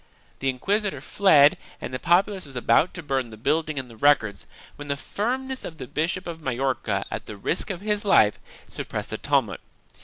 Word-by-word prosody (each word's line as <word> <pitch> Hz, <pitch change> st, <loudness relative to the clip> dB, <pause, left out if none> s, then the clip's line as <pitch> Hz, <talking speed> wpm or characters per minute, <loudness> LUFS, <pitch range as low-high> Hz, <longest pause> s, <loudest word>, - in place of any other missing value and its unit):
The 135 Hz, -, 0 dB
inquisitor 200 Hz, -, -1 dB
fled 150 Hz, -8 st, +5 dB, 0.2 s
and -, -, -6 dB
the 130 Hz, -, -2 dB
populace 185 Hz, +2 st, +2 dB
was 135 Hz, -, -11 dB
about 125 Hz, +7 st, +3 dB
to 175 Hz, -, -7 dB
burn 135 Hz, -4 st, -1 dB
the 110 Hz, -, -11 dB
building 155 Hz, +5 st, 0 dB
and 130 Hz, -1 st, -3 dB
the 115 Hz, -, -13 dB
records, 110 Hz, -6 st, +2 dB, 0.3 s
when 145 Hz, -, -9 dB
the 140 Hz, 0 st, -1 dB
firmness 260 Hz, -, -3 dB
of 160 Hz, -, -7 dB
the 130 Hz, -, -6 dB
Bishop 165 Hz, +8 st, -2 dB
of 165 Hz, -1 st, -6 dB
Majorca, 130 Hz, -6 st, -1 dB
at -, -, -5 dB
the 105 Hz, -, -7 dB
risk 165 Hz, -, -1 dB
of 185 Hz, -3 st, -4 dB
his 210 Hz, 0 st, 0 dB
life, 110 Hz, -, +4 dB, 0.3 s
suppressed -, -, -5 dB
the -, -, -4 dB
tumult. -, -, +1 dB
150 Hz, 190 wpm, -25 LUFS, 130-190 Hz, 0.3 s, fled